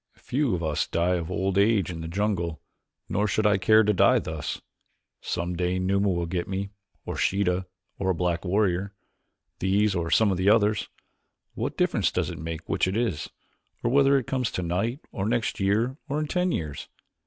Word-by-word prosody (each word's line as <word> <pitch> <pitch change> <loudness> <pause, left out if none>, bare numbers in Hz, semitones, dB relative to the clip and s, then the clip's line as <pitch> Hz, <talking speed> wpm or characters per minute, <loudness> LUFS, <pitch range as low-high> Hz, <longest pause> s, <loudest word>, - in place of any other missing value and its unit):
Few 135 -5 0
of 85 - -4
us 75 -2 0
die 85 +2 +1
of 85 -2 -4
old 95 +1 0
age 100 -4 +3
in 85 -1 -6
the 80 - -5
jungle, 85 -4 -1 0.5
nor 105 +2 0
should 105 +2 0
I 105 -2 +4
care 110 +3 +5
to 105 0 +2
die 95 - +5
thus. 80 -2 -4 0.6
Some 85 +1 -3
day 90 +1 0
Numa 100 +2 +1
will 85 -2 0
get 85 +1 -3
me, 100 +1 -3 0.3
or - - -4
Sheeta, 95 -1 +1 0.3
or 95 - 0
a 95 - +2
black 85 0 -1
warrior. 100 0 0 0.6
These 100 +2 +2
or 85 -2 -1
some 105 +5 +4
of 95 - 0
the 95 +2 +3
others. 105 -1 +3 0.6
What - - -3
difference - - +2
does - - -1
it - - -8
make 80 +1 -6
which - - +1
it 95 +3 -1
is, 115 -11 -1 0.5
or 120 - +1
whether 140 +1 +5
it 130 - -2
comes 130 -3 -1
tonight 95 - -2
or 95 +1 -2
next 120 0 -1
year 110 +7 +1
or 145 +2 0
in 155 - -1
ten 180 +3 0
years? 75 - -4
95 Hz, 190 wpm, -26 LUFS, 85-110 Hz, 0.6 s, care